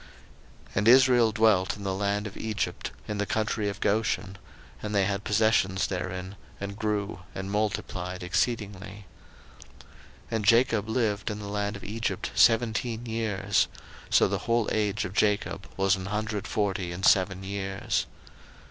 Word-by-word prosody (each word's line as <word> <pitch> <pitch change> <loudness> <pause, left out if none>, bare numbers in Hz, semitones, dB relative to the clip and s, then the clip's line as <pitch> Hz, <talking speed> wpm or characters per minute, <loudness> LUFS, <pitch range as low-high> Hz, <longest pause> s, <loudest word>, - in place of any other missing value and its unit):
01:047:027 - - -19
And 105 +3 +2
Israel 125 -2 +6
dwelt 105 -3 +3
in 100 - -9
the 95 -1 -1
land 100 +1 -1
of 100 - -7
Egypt, 110 -2 -3 0.2
in 105 -1 -3
the 105 - -1
country 110 -1 0
of 100 -1 -6
Goshen; 100 -3 0 0.4
and 105 0 -3
they 100 -1 +4
had 100 0 -2
possessions 105 -3 +2
therein, 95 +1 -4 0.2
and 100 0 -5
grew, 105 -3 -2 0.2
and 95 +1 -4
multiplied 95 -3 -2
exceedingly. 100 0 -2 0.6
01:047:028 - - -25 0.6
And 110 -2 -1
Jacob 115 -1 +4
lived 110 -3 0
in 105 - -3
the 105 - -7
land 105 0 -2
of 100 - -9
Egypt 115 +3 -3
seventeen 115 0 +2
years: 110 -4 0 0.4
so - - +5
the - - -1
whole 115 -2 +2
age 105 -1 0
of 90 - -6
Jacob 105 -2 0
was 95 0 +3
an 95 -1 -6
hundred 105 0 -2
forty 100 -4 -1
and 90 +3 -3
seven 95 0 +3
years. 95 0 -2
105 Hz, 155 wpm, -27 LUFS, 95-110 Hz, 0.6 s, Israel